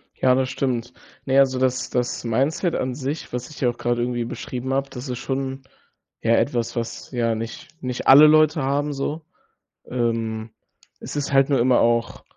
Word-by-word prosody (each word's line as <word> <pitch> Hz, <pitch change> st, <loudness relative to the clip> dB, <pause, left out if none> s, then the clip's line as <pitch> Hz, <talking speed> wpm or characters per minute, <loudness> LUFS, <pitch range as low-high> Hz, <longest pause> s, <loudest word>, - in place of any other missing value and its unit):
Ja, 130 Hz, -1 st, +3 dB
das 130 Hz, 0 st, 0 dB
stimmt. 125 Hz, -2 st, -2 dB, 0.3 s
Ne, 135 Hz, 0 st, +2 dB
also 130 Hz, -1 st, +4 dB
das 130 Hz, 0 st, 0 dB
das 125 Hz, -1 st, -2 dB
Mindset 135 Hz, -, 0 dB
an 125 Hz, 0 st, -2 dB
sich, 140 Hz, +3 st, -5 dB
was 125 Hz, 0 st, -4 dB
ich 155 Hz, -, -11 dB
ja 125 Hz, -, +3 dB
auch 120 Hz, -, -10 dB
gerade 120 Hz, 0 st, 0 dB
irgendwie 120 Hz, -1 st, -1 dB
beschrieben 125 Hz, +2 st, -5 dB
habe, 135 Hz, 0 st, -1 dB
das 125 Hz, +2 st, -7 dB
ist 125 Hz, -1 st, -3 dB
schon 135 Hz, 0 st, -3 dB, 0.6 s
ja, 115 Hz, 0 st, +3 dB
etwas, 120 Hz, -2 st, 0 dB
was 115 Hz, -1 st, -5 dB
ja 115 Hz, -2 st, +1 dB
nicht 115 Hz, +1 st, -6 dB
nicht 125 Hz, -1 st, -4 dB
alle 145 Hz, +3 st, +10 dB
Leute 155 Hz, 0 st, +4 dB
haben 145 Hz, +2 st, 0 dB
so. 145 Hz, +3 st, -4 dB, 0.7 s
Ähm, 115 Hz, -2 st, -2 dB, 0.5 s
es -, -, -8 dB
ist 145 Hz, -1 st, -2 dB
halt 135 Hz, 0 st, +4 dB
nur 140 Hz, -3 st, +3 dB
immer 125 Hz, +1 st, +4 dB
auch 115 Hz, 0 st, +1 dB
130 Hz, 185 wpm, -23 LUFS, 120-135 Hz, 0.7 s, alle